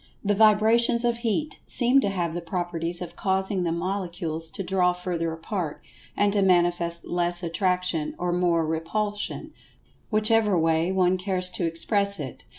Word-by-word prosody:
The 205 - +2
vibrations 220 +3 +4
of 235 -1 +1
Heat 235 +6 -2
seem 255 +2 +4
to 200 - 0
have 175 -4 -2
the 175 - -4
properties 175 0 -1
of 170 - -10
causing 190 0 -1
the 170 -2 -1
Molecules 170 -2 -3
to 195 - -6
draw 180 -1 +1
further 175 -2 -3
apart, 160 -1 -4 0.4
and 205 0 +2
to 205 - +2
manifest 175 -2 +2
less 175 0 -1
Attraction, 180 -2 -1
or 175 0 -1
more 175 -2 +1
Repulsion, 205 +7 -3 0.6
whichever 215 -2 +2
way 165 +2 +1
one 185 -1 +2
cares 185 -1 -1
to 175 - -2
express 200 +4 +1
it. 135 -4 -7
180 Hz, 155 wpm, -25 LUFS, 170-205 Hz, 0.6 s, vibrations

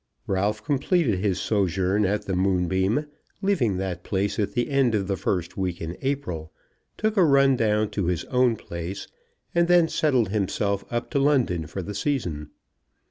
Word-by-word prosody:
Ralph 105 +2 -1
completed 145 - +1
his 95 -2 0
sojourn 95 0 +1
at 105 +2 -1
the 95 - -2
Moonbeam, 95 - +1 0.4
leaving 130 - +1
that 90 -2 -4
place 100 +2 -1
at 100 -1 -1
the 120 +5 -1
end 135 -5 +3
of 100 -2 0
the 100 0 -1
first 90 -2 -2
week 90 -3 -2
in 85 +1 -5
April, 130 - -3 0.5
took 215 0 0
a 190 - +6
run 140 -3 +5
down 110 -2 +1
to 100 -5 -1
his 90 -2 -1
own 125 -2 +2
place, 85 -1 -6 0.5
and 170 0 +3
then 175 -2 +5
settled 130 -9 +1
himself 100 0 -1
up 120 0 -3
to 140 - +1
London 125 - +2
for 95 +4 -5
the 105 - -6
season. 95 - -2
105 Hz, 170 wpm, -25 LUFS, 95-135 Hz, 0.5 s, a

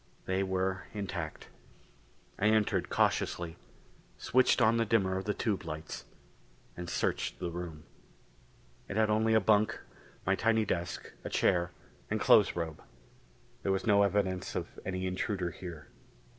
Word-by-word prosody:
They 95 +1 0
were 95 0 -1
intact. 100 -3 -5 0.9
I 100 - +1
entered 110 -1 +2
cautiously, 85 -2 +1 0.6
switched 130 +1 +3
on 115 -1 +4
the 115 - +3
dimmer 100 -4 +2
of 95 - -3
the 105 - 0
tube 100 -5 -1
lights, 80 -1 -6 0.7
and 90 0 -6
searched - - -1
the 85 - -3
room. 85 -3 -6 1.0
It 100 - -4
had 110 -1 +3
only 110 +1 +3
a - - +7
bunk, 110 0 +3 0.5
my 95 - +3
tiny 110 +2 +2
desk, 85 -2 -3
a - - -4
chair 85 0 +2 0.4
and - - 0
clothes - - +5
robe. 80 -3 -4 0.8
There 100 - 0
was 95 +3 0
no 100 -2 +5
evidence 100 -2 0
of - - -4
any 95 0 -3
intruder 95 -1 -1
here. 85 -6 -9
95 Hz, 145 wpm, -31 LUFS, 90-105 Hz, 1.0 s, a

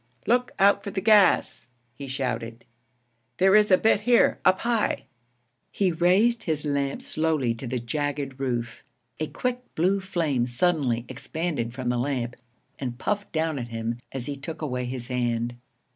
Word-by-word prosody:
'Look 250 +2 +2
out 200 +1 +4
for - - -4
the 195 - -2
gas!' 205 - +4 0.3
he 140 +3 -8
shouted. 120 -3 -4 0.7
'There 190 +2 +5
is 210 0 +5
a 185 - +7
bit 220 0 +3
here, 240 +2 +4
up 185 - +4
high.' 235 -2 0 0.7
He 190 -3 +1
raised 195 +8 +3
his 155 -2 -1
lamp 140 -1 -1
slowly 155 -7 0
to 115 +2 -7
the 125 +1 -2
jagged 140 +2 -3
roof. 120 -3 -3 0.4
A 155 - -1
quick 250 +6 -2
blue 185 +5 +2
flame 160 -10 0
suddenly 125 -3 +1
expanded 150 -9 -3
from 130 -2 -2
the 125 0 0
lamp 125 -2 -2 0.4
and 125 -3 -4
puffed 205 +7 -2
down 160 -2 -1
at 120 - -5
him 115 0 -4
as 130 -3 -5
he 145 - -4
took 155 +3 -7
away 125 -4 -2
his 125 -1 -5
hand. 120 -1 -1
145 Hz, 160 wpm, -26 LUFS, 120-185 Hz, 0.7 s, a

